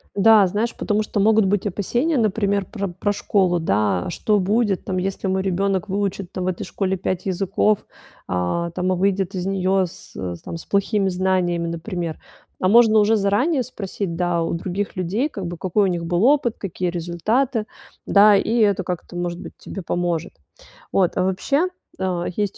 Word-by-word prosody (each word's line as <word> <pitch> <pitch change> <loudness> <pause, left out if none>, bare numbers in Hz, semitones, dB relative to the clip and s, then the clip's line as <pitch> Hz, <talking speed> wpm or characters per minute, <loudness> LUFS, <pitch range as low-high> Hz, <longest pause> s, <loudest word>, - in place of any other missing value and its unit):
Да, 210 0 +6
знаешь, 210 +5 -2
потому 215 0 0
что 210 -1 -1
могут 220 0 +4
быть 195 +1 0
опасения, 240 - 0
например, 200 -3 +1
про 200 -1 -4
про 190 +4 -1
школу, 190 -3 +1
да. 105 - +1
А - - -3
что 210 +4 +1
будет 205 0 +1
там, 185 - -3
если 195 +1 -2
мой 190 0 +1
ребенок 190 +1 0
выучит 195 -2 -2
там 185 - -3
в - - -2
этой 185 -2 -2
школе 190 -1 -2
5 185 0 -3
языков, 195 +2 +1 0.4
а, 90 - -1
там, 180 +2 -1
а - - +2
выйдет 195 0 0
из 180 -1 -3
нее 190 0 +1
с - - -14
с 90 -2 -5
там - - -7
плохими 200 0 +1
знаниями, 180 -2 0
например? 170 -1 -4 0.4
А 185 - +1
можно 220 +1 +6
уже 210 +2 +4
заранее 220 +9 +2
спросить, 195 -6 -5
да, 175 -1 +1
у 165 - -2
других 185 +4 -3
людей, 200 - 0
как 195 - -5
бы, 175 0 -6
какой 190 +4 +1
у - - +2
них 175 -2 -2
был 175 +3 +1
опыт, 270 -4 +3
какие 185 -2 -3
результаты, 210 +9 -1 0.4
да, 205 +1 +6
и 220 +4 +1
это 200 -3 +3
как-то, 180 0 -5
может 175 0 -3
быть, - - -9
тебе 195 - -7
поможет. 175 -1 -2 0.6
Вот, 185 -3 +2
а 185 - +2
вообще, 275 - +1 0.3
есть, 185 +2 -2
190 Hz, 180 wpm, -22 LUFS, 175-210 Hz, 0.6 s, Да